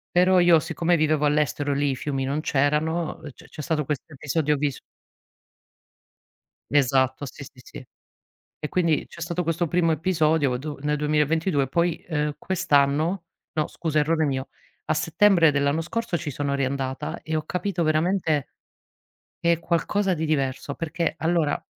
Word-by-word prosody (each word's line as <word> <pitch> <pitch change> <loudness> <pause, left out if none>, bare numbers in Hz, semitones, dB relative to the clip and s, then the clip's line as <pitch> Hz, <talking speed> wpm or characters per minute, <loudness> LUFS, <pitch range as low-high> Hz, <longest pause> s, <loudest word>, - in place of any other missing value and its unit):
però 180 +1 +5
io 175 -2 +6
siccome 165 +2 0
vivevo 155 -1 +2
all'estero, 145 -1 +1
lì 140 0 +1
i 135 - -2
fiumi 135 0 -3
non 140 +3 -1
c'erano, 155 +4 0 0.2
c - - -16
c'è 155 - -9
stato 150 -1 -1
questo 150 +2 -4
episodio 150 +2 0
vis 145 -2 -2 1.9
Esatto 130 -1 +2
sì, 140 - -9
sì, 125 - -16
sì. 130 - -11 0.7
E 150 - -3
quindi 170 -3 +1
c'è 170 - -13
stato 170 +1 -2
questo 165 +1 -1
primo 165 0 +2
episodio 155 -5 +1
do 145 +2 -6
nel 150 0 0
2022 150 0 +1
poi, 170 +3 0
uhm, 150 -2 -1
quest'anno 155 +1 +1 0.3
no 155 -1 0
scusa 155 -2 -2
errore 160 +2 +1
mio, 135 -2 -2 0.4
a 155 - +1
settembre 165 +2 +4
dell'anno 140 +2 +1
scorso 230 +3 -2
ci 150 - -4
sono 140 +1 -2
riandata 140 +3 -2
e 160 - -4
ho 155 - -1
capito 180 +1 -2
veramente 155 -1 +1 0.9
che 170 0 +3
è 165 - -3
qualcosa 190 +3 0
di 160 -2 -2
diverso, 140 -2 -1
perché 165 +1 -2
allora 165 -2 0
155 Hz, 150 wpm, -24 LUFS, 145-170 Hz, 1.9 s, io